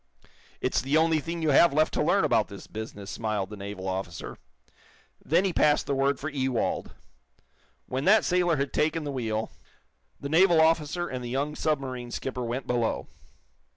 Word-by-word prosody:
"It's - - +1
the 140 +4 +1
only 160 0 +3
thing 165 +2 -5
you 155 - +3
have 165 +3 +6
left 155 +2 +2
to - - 0
learn - - +3
about - - +2
this - - -10
business," 105 -3 -7
smiled 105 0 -2
the - - -6
naval 100 -1 -6
officer. 95 -3 -5 0.8
Then 170 +6 +2
he 190 - 0
passed 150 -2 +3
the 140 - -1
word 135 0 +1
for 155 - -4
Ewald. 130 -5 -2 0.9
When 130 +3 -3
that 215 +2 +6
it - - -6
sailor 175 -2 +2
had 140 0 -2
taken 160 +1 +1
the 145 - -4
wheel, 110 -4 -2 0.7
the 140 - -5
naval 170 +2 +5
officer 160 +2 +2
and 130 -1 -5
the 120 - -5
young 140 +4 -1
submarine 130 -6 -2
skipper 125 +1 -4
went 120 +3 -3
below. 120 -2 -1
140 Hz, 180 wpm, -27 LUFS, 120-160 Hz, 0.9 s, have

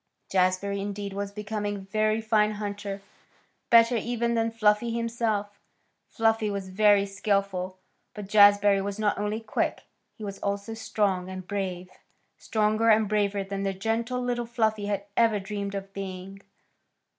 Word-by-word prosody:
Jazbury, 185 +2 +1
indeed, 200 0 -4
was 200 0 -4
becoming 210 0 -3
a - - -6
very 215 +3 0
fine 215 -1 +2
hunter, 205 -1 -5 0.7
better, 230 +1 +6
even, 235 +1 -1
than 230 -1 +1
Fluffy 225 0 +2
himself. 230 -3 -2 0.5
Fluffy 225 -1 +1
was 200 -2 -4
very 205 +1 +4
skilful, 195 -2 -1 0.4
but 210 -2 -6
Jazbury 205 -1 +6
was 200 0 -4
not 210 -2 0
only 210 +1 -1
quick, 220 - -1 0.3
he 220 - -10
was 200 -1 -6
also 200 +2 -3
strong 200 -4 -1
and 185 -1 -7
brave; 185 -2 -4 0.5
stronger 215 +1 +1
and 215 -1 +5
braver 205 -1 0
than 195 0 -5
the 195 -1 -1
gentle 225 +5 -1
little 240 -1 -2
Fluffy 220 -3 0
had 200 -1 -2
ever 225 -3 +3
dreamed 200 0 -4
of 195 0 -6
being. 195 0 -7
205 Hz, 145 wpm, -27 LUFS, 195-220 Hz, 0.7 s, better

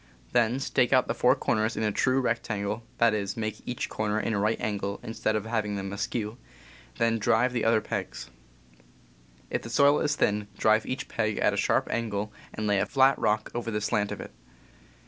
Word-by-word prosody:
Then 120 -1 +3
.J,, - - -1
stake 125 - +2
out 130 -1 +4
the - - 0
four 125 - +4
corners 110 0 0
in - - -1
a 105 - +1
true 130 +5 +2
rect 115 -2 -1
angle 105 +1 -2 0.2
(that 115 -1 +4
is, 100 -1 -2
make 110 -1 -3
each 125 - -2
corner 105 0 -1
a 110 - -1
right 105 +2 +1
angle, 100 -1 -2
instead 110 -1 -1
of 105 -1 -2
having 110 -2 -1
them 95 0 -4
askew). 110 +2 -3 0.6
Then 115 -1 +2
drive 115 +4 +2
the 120 - -1
other 115 -1 +3
pegs. - - -5 1.2
If - - -1
the 115 - -8
soil 140 +4 +4
is 150 - +1
thin, 105 -5 +1
drive 110 0 +3
each 130 +2 -3
peg 110 -2 -1
at - - +2
a - - -1
sharp - - +1
angle 105 -2 -2 0.2
and 110 - -4
lay 100 -1 +2
a - - 0
flat 135 0 +4
rock 110 0 0
over 120 -1 -3
the 105 -1 -1
slant 105 0 0
of - - -5
it. - - -8
110 Hz, 205 wpm, -27 LUFS, 105-120 Hz, 1.2 s, out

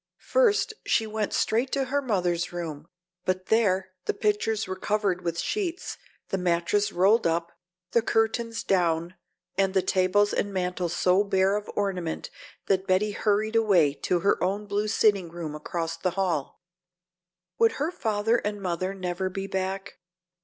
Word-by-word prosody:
First 475 -2 +3
she 225 - +2
went 215 -1 -2
straight 235 +4 +1
to 275 - +2
her 280 +2 0
mother's 180 -8 0
room, 165 -3 -6 0.4
but 185 0 -2
there 190 -4 +2
the - - -1
pictures 215 0 0
were 185 - -4
covered 195 -2 0
with 170 -1 -2
sheets, 370 - -2 0.3
the 195 - -1
mattress 180 +4 +1
rolled 195 +4 +4
up, 170 +1 -1 0.4
the 235 - +4
curtains 225 +1 0
down, 170 -2 +1 0.5
and 195 0 +2
the 190 - +3
tables 190 +2 +2
and 205 - -1
mantel 180 -2 -1
so 180 +3 +3
bare 195 -1 +2
of 210 0 -4
ornament 185 -5 -2 0.3
that 190 0 +1
Betty 190 +3 +2
hurried 215 +2 0
away 190 -10 +4
to 175 +4 -1
her 200 - +2
own 200 +3 -1
blue 205 +1 -1
sitting 205 -4 +2
room 165 -2 -6
across 165 +2 -3
the 175 +2 0
hall. 175 -4 -1 1.0
Would 230 -1 +5
her 300 +4 -1
father 225 -5 +1
and 210 -2 -3
mother 185 0 -2
never 185 0 -2
be 195 +1 -4
back? 190 +1 -4
195 Hz, 155 wpm, -26 LUFS, 180-215 Hz, 1.0 s, Would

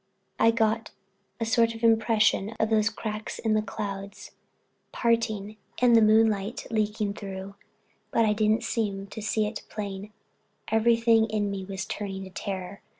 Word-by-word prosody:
I 230 - +6
got 225 0 +1 0.5
a 230 - -1
sort 230 0 +2
of 225 - -10
impression 225 -2 +3
of 220 0 +1
those 215 0 +3
cracks 215 -1 -5
in 220 -1 0
the 215 - +3
clouds 200 -1 -6 0.6
parting 220 -3 0 0.2
and 245 -1 +5
the 225 - +7
moonlight 215 0 +3
leaking 210 -2 0
through; 195 -1 -7 0.6
but 230 - +2
I 210 - +3
didn't 215 +2 +2
seem 205 -4 -2
to 205 +2 -8
see 215 +1 0
it 210 0 -4
plain, 205 -1 -6 0.6
everything 230 0 +4
in 210 -2 -1
me 195 -1 -4
was 190 0 -5
turned 195 -2 -5
to 190 - -10
terror. 190 0 -5
215 Hz, 150 wpm, -27 LUFS, 200-225 Hz, 0.6 s, the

